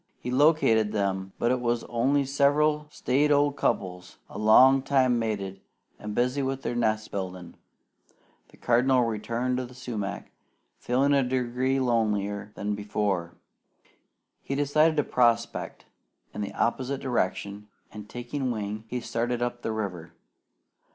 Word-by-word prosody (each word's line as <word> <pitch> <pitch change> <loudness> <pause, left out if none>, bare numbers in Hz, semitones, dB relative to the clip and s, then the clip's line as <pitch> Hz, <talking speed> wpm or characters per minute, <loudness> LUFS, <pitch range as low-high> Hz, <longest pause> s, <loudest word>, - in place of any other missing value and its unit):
He 125 - -5
located 125 -7 +3
them, 95 -2 -1
but 120 - +1
it 130 - +1
was 120 -1 -1
only 135 +4 +1
several 150 +2 +2
staid 145 +1 +1
old 145 0 +3
couples, 90 -8 -2
a - - -7
long 130 +5 +6
time 130 -3 +2
mated, 100 -4 -3 0.4
and 105 0 -6
busy 125 +3 +1
with 135 0 -3
their 120 - -2
nest 110 -2 0
building. 90 -3 -5 1.0
The - - -20
Cardinal 125 +1 +3
returned 115 +3 -2
to 130 - -2
the 125 - -15
sumac, 110 -6 -5 0.5
feeling 135 +4 +1
a 140 - +4
degree 130 +1 0
lonelier 105 -4 0
than 105 0 -2
ever. 95 -5 -2 1.1
He 135 - -4
decided 155 +3 +2
to 150 - +3
prospect 120 -3 0 0.5
in - - -5
the 100 - -4
opposite 130 +3 -1
direction, 105 -4 -2 0.2
and 105 0 -10
taking 125 +2 -4
wing, 110 -1 -4
he 125 +2 -4
started 120 +1 -2
up 120 0 -3
the 115 - -2
river. 95 -7 -5
120 Hz, 140 wpm, -27 LUFS, 105-130 Hz, 1.1 s, long